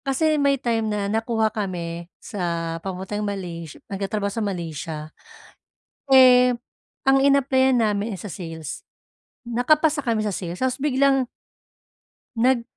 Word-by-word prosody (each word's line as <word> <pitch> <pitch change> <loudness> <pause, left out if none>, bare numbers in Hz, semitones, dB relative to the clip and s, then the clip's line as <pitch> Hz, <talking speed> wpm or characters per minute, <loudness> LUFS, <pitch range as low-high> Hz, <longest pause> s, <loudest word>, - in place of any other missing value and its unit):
Kasi 300 +3 +2
may 280 -1 +3
time 230 -4 -1
na 210 -1 -1
nakuha 220 +1 0
kami 175 -4 -4
sa 205 -5 -7 0.4
papuntang 190 +3 -4
Malays 175 -6 -5
nagtatrabaho 200 +1 -3
sa 225 - -2
Malaysia. 160 -5 -4 0.9
Eh, 255 -2 +7 0.5
ang 270 0 +4
inaplayan 265 -2 +3
namin, 210 0 0
eh, 190 - -7
sa 210 - -7
sales. 165 -3 -7 0.6
Nakapasa 295 +6 +2
kami 225 -5 0
sa 205 - -1
sales, 175 -1 -5
tapos 260 +4 -1
biglang 270 -2 +2 1.1
nag 245 +1 +3
220 Hz, 120 wpm, -23 LUFS, 190-260 Hz, 1.1 s, Eh